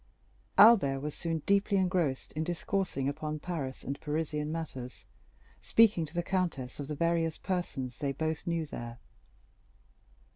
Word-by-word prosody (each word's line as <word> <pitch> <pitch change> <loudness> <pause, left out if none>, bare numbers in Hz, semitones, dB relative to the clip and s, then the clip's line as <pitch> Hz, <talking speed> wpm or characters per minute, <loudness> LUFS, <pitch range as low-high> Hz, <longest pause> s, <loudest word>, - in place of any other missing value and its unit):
Albert 195 -12 +7
was 150 +2 -4
soon 165 -3 -3
deeply 200 0 +3
engrossed 180 -8 0
in 155 - -1
discoursing 175 -4 -1
upon 155 +2 -3
Paris 150 -5 -4
and 140 +1 -4
Parisian 150 0 -2
matters, 135 -6 -6 0.6
speaking 210 -8 +4
to 155 - -12
the 175 - 0
countess 170 -10 -2
of 140 - -4
the 150 - -3
various 165 0 +1
persons 135 -10 -3
they 140 -1 0
both 155 +3 -3
knew 170 -1 0
there. 120 -4 -7
155 Hz, 140 wpm, -31 LUFS, 140-175 Hz, 0.6 s, Albert